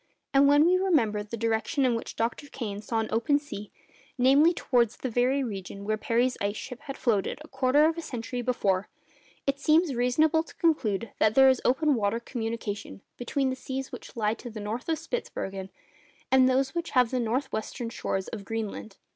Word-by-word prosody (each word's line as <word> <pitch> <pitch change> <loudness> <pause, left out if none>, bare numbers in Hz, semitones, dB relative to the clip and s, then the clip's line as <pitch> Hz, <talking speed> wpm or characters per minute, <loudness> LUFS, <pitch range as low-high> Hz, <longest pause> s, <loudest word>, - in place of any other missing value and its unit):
And 275 +1 +6
when 290 +2 +6
we 360 +2 +4
remember 255 - +2
the 215 +3 -6
direction 230 +6 0
in 250 - +3
which 230 - -4
Dr. 230 +5 -2
Kane 210 -7 -5
saw 225 +1 -3
an 220 - -4
open 235 +6 +2
sea—namely, 275 +3 0
towards 245 -8 +1
the 260 - -4
very 255 +4 +2
region 200 -3 -6
where 215 +1 +1
Parry's 240 +3 0
ice—ship 215 +5 -3
had 275 - -5
floated 215 -6 0
a - - -13
quarter 280 +3 +3
of 325 +1 +1
a - - -3
century 245 -3 -5
before—it 240 +4 -3
seems 310 +1 +3
reasonable 285 +7 +3
to 325 - -13
conclude 230 - 0
that 215 +1 +3
there 265 0 +8
is 260 -2 +2
open 295 +4 +3
water 220 -1 0
communication 225 - -5
between 260 +2 -1
the - - -2
seas 265 0 -5
which - - -10
lie 215 -2 +1
to 240 +2 -8
the 220 -1 -8
north 215 +7 -4
of 320 - +1
Spitzbergen 195 - -5 0.6
and 260 -1 +6
those 265 +1 +1
which 340 -4 -4
lave 250 -2 +4
the 255 - 0
north 250 +4 -1
western 230 +2 -4
shores 195 -4 -3
of 210 -3 -6
Greenland. 215 -1 -5
245 Hz, 185 wpm, -27 LUFS, 220-275 Hz, 0.6 s, there